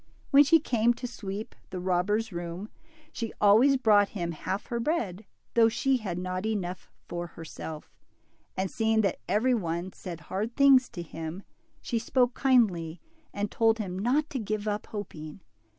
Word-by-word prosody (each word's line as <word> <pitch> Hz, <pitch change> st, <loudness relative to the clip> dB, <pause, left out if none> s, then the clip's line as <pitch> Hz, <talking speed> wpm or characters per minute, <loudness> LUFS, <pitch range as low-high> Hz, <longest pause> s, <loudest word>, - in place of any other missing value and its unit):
When 280 Hz, 0 st, +8 dB
she 325 Hz, +3 st, +6 dB
came 240 Hz, -4 st, +2 dB
^fo 245 Hz, +1 st, -5 dB
sweep 205 Hz, -2 st, -6 dB, 0.2 s
the 185 Hz, -, -5 dB
robber's 190 Hz, +5 st, 0 dB
room, 175 Hz, +4 st, -5 dB, 0.4 s
she 230 Hz, -6 st, -4 dB
always 230 Hz, +7 st, +6 dB
brought 210 Hz, -5 st, +4 dB
him 170 Hz, -2 st, -2 dB
haljTher 205 Hz, +8 st, -3 dB
bread, 220 Hz, -, -1 dB, 0.3 s
thoughvshe 235 Hz, +3 st, +3 dB
had 190 Hz, -6 st, -4 dB
not 185 Hz, +1 st, -3 dB
enough 190 Hz, -5 st, -3 dB, 0.2 s
for 175 Hz, 0 st, -4 dB
herself; 160 Hz, -1 st, -8 dB, 0.7 s
and 190 Hz, 0 st, -1 dB
seeing 220 Hz, -1 st, +2 dB
that 195 Hz, -, 0 dB
every 245 Hz, +5 st, +3 dB
'one 175 Hz, -4 st, -2 dB
said 170 Hz, -4 st, -8 dB
hard 205 Hz, +8 st, -4 dB
things 270 Hz, -2 st, +6 dB
to 175 Hz, -, -6 dB
him, 165 Hz, +3 st, -7 dB, 0.4 s
she 230 Hz, -, -1 dB
spoke 245 Hz, +2 st, +2 dB
kindly, 190 Hz, -, +2 dB, 0.3 s
and 205 Hz, 0 st, -3 dB
told 225 Hz, -1 st, +3 dB
him 190 Hz, -4 st, -4 dB
not 270 Hz, +8 st, +2 dB
to 265 Hz, -, -2 dB
give 215 Hz, -1 st, -3 dB
up 210 Hz, 0 st, -2 dB
hopmg. 160 Hz, -5 st, -7 dB
210 Hz, 155 wpm, -28 LUFS, 180-235 Hz, 0.7 s, When